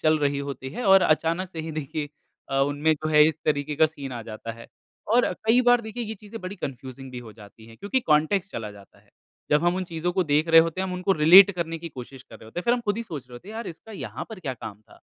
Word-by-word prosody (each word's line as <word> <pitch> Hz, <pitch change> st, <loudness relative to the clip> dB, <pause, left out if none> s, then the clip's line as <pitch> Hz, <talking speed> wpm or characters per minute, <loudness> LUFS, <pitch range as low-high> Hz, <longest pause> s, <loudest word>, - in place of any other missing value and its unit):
चल 155 Hz, 0 st, +3 dB
रही 145 Hz, -1 st, 0 dB
होती 140 Hz, -2 st, -5 dB
है 245 Hz, -, -5 dB
और 195 Hz, -1 st, +6 dB
अचानक 165 Hz, +4 st, +1 dB
से 165 Hz, -, -10 dB
ही 160 Hz, 0 st, -6 dB
देखिए 150 Hz, 0 st, -4 dB, 0.4 s
अ, -, -, -2 dB
उनमें 145 Hz, +3 st, +2 dB
जो 155 Hz, +1 st, -5 dB
है 150 Hz, -1 st, +6 dB
इस 160 Hz, -, -2 dB
तरीके 150 Hz, 0 st, 0 dB
का 160 Hz, +1 st, +5 dB
सीन 140 Hz, -4 st, -8 dB
आ 120 Hz, -2 st, -6 dB
जाता 110 Hz, +1 st, -7 dB
है। 115 Hz, +1 st, -13 dB, 0.5 s
और 245 Hz, -, +3 dB
कई 240 Hz, +3 st, +5 dB
बार 245 Hz, 0 st, +5 dB
देखिए 235 Hz, +1 st, -6 dB
ये 220 Hz, 0 st, -5 dB
चीज़ें 215 Hz, +2 st, -9 dB
बड़ी 185 Hz, +2 st, -6 dB
कन्फ़्यूज़िंग 130 Hz, 0 st, -7 dB
भी 125 Hz, -, -6 dB
हो 115 Hz, -3 st, -10 dB
जाती 110 Hz, +1 st, -15 dB
हैं 115 Hz, 0 st, -15 dB
क्योंकि 205 Hz, -, -1 dB
कॉन्टेक्स्ट 175 Hz, +2 st, +1 dB
चला 110 Hz, -2 st, -5 dB
जाता 100 Hz, -1 st, -17 dB
है। -, -, -30 dB, 0.4 s
जब 150 Hz, +3 st, +3 dB
हम 175 Hz, +1 st, +2 dB
उन 185 Hz, -, -2 dB
चीजों 170 Hz, +1 st, -3 dB
को 185 Hz, -1 st, +1 dB
देख 150 Hz, +2 st, +1 dB
रहे 165 Hz, 0 st, +8 dB
होते 165 Hz, +2 st, -1 dB
हैं 190 Hz, -, -1 dB
हम 185 Hz, -, -4 dB
उनको 180 Hz, +2 st, +1 dB
रिलेट 180 Hz, +5 st, +8 dB
करने 165 Hz, -1 st, -3 dB
की 170 Hz, +1 st, -7 dB
कोशिश 130 Hz, -2 st, -10 dB
कर 110 Hz, -, -14 dB
रहे -, -, -16 dB
होते 140 Hz, +11 st, -6 dB
हैं। -, -, -12 dB
फ़िर 240 Hz, +1 st, +4 dB
हम 245 Hz, -, -2 dB
खुद 210 Hz, -2 st, -1 dB
ही 230 Hz, -, -3 dB
सोच 155 Hz, -, -7 dB
रहे 125 Hz, -, -12 dB
होते 180 Hz, +11 st, -12 dB
हैं 220 Hz, -, -8 dB
यार 230 Hz, +1 st, -5 dB
इसका 180 Hz, +6 st, -10 dB
यहाँ 200 Hz, -, -6 dB
पर 215 Hz, -4 st, -8 dB
क्या 135 Hz, -7 st, -4 dB
काम 105 Hz, -3 st, -9 dB
था? 110 Hz, -, -21 dB
155 Hz, 280 wpm, -25 LUFS, 135-190 Hz, 0.5 s, रहे